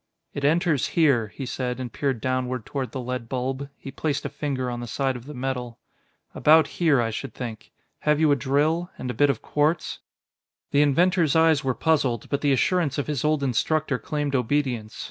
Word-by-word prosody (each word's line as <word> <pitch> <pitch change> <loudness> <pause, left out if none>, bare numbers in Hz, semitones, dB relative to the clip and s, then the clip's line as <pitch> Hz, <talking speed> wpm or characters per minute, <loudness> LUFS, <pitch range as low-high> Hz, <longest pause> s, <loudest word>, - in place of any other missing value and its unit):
"It 140 - -5
enters 160 0 +2
here," 140 -9 +4
he 135 +5 -7
said 125 0 -3
and 125 -2 -5
peered 135 -5 -1
downward 130 -2 -1
toward 130 -5 -4
the 130 - -5
lead 125 -2 -4
bulb. 130 +2 -3
He 135 - -9
placed 145 +1 -2
a - - -1
finger 140 -2 -3
on 120 -1 -3
the 120 - -6
side 135 +3 -1
of 120 0 -9
the 150 - -8
metal. 125 -2 -4 0.6
"About 155 0 +5 0.2
here, 155 -6 +4
I 115 -1 0
should 115 +2 -6
think.... 115 -4 -7 0.3
Have 150 0 +2
you 155 -2 +4
a - - +5
drill? 150 +6 +1
And 125 -1 -4
a - - -5
bit 145 +2 +3
of 140 - -1
quartz?" 150 +3 0 0.7
The 145 - +4
inventor's 165 +2 +3
eyes 160 -2 +4
were 130 -2 0
puzzled, 140 -8 +1
but 140 0 -1
the 145 - +2
assurance 150 +1 +1
of 145 - -1
his 150 -4 -2
old 150 -1 +1
instructor 135 +3 0
claimed 150 -4 -2
obedience. 125 -4 -1
140 Hz, 200 wpm, -25 LUFS, 125-150 Hz, 0.7 s, About